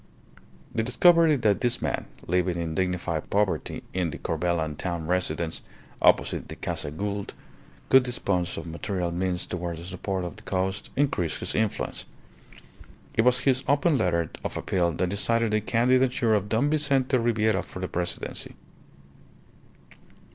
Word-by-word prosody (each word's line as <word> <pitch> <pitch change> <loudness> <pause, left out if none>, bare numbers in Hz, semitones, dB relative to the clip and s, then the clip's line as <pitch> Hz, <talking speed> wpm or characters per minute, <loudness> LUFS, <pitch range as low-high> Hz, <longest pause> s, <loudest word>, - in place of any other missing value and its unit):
The 110 - +1
discovery 165 +6 +5
that 110 -6 +2
this 120 -2 +1
man, - - -2 0.2
living 90 0 +1
in 80 -1 -2
dignified 90 -2 -1
poverty 100 -1 0
in 90 -2 0
the - - -6
Corbelan 80 -2 -1
town 85 0 -3
residence 85 -2 -1 0.4
(opposite - - +3
the - - -7
Casa - - -3
Gould), 100 +6 -4 0.5
could 130 - +8
dispose 100 -8 -1
of - - -5
material 85 +1 -3
means 90 0 -1
towards 85 -2 -4
the 85 - -9
support 95 0 -3
of 85 - -7
the - - -13
cause 95 +1 -1
increased 135 - 0
his - - -3
influence. 110 0 -1 1.1
It - - +3
was 125 +1 +3
his 130 -1 +2
open 145 +3 +3
letter 85 - +1
of - - -3
appeal 85 -2 +1
that 90 - 0
decided 115 +3 +1
the 110 0 +2
candidature 125 +1 +2
of 105 -1 +1
Don 125 +7 +2
Vincente 135 -4 +2
Ribiera 110 -3 +2
for 95 - -9
the 95 - -2
Presidency. 90 0 -4
95 Hz, 145 wpm, -26 LUFS, 90-120 Hz, 1.1 s, could